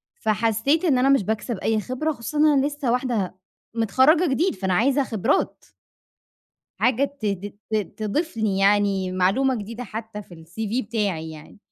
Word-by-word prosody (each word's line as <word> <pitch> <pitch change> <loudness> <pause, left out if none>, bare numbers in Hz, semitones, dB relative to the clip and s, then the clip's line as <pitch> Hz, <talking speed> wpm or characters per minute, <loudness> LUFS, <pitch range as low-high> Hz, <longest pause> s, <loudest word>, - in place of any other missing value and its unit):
فحسيت 225 - +1
إن 285 -7 +3
أنا 260 +2 +3
مش 275 -6 +4
باكسب 220 +3 -2
أي 220 +2 +1
خبرة 255 +8 -2
خصوصًا 290 +2 -6
إن 300 - +5
أنا 280 -2 +3
لسّه 290 -4 -2
واحدة 240 -7 -1 0.4
مِتخرجة 260 - +4
جديد، 320 - +1
فأنا 190 -1 -1
عايزة 270 +8 +3
خبرات. 225 +2 -1 1.2
حاجة 255 +2 +3 0.2
ت 215 - -2
ت 200 0 -3 0.2
ت - - -1 0.2
تضيف 230 +9 -2
لي 215 -3 0
يعني 195 -2 +2
معلومة 195 +9 +2
جديدة 230 +4 -7
حتى 220 -1 -7
في 185 - -15
الCV 205 +9 -4
بتاعي 200 -8 -2
يعني. 155 +5 -13
225 Hz, 160 wpm, -23 LUFS, 200-265 Hz, 1.2 s, إن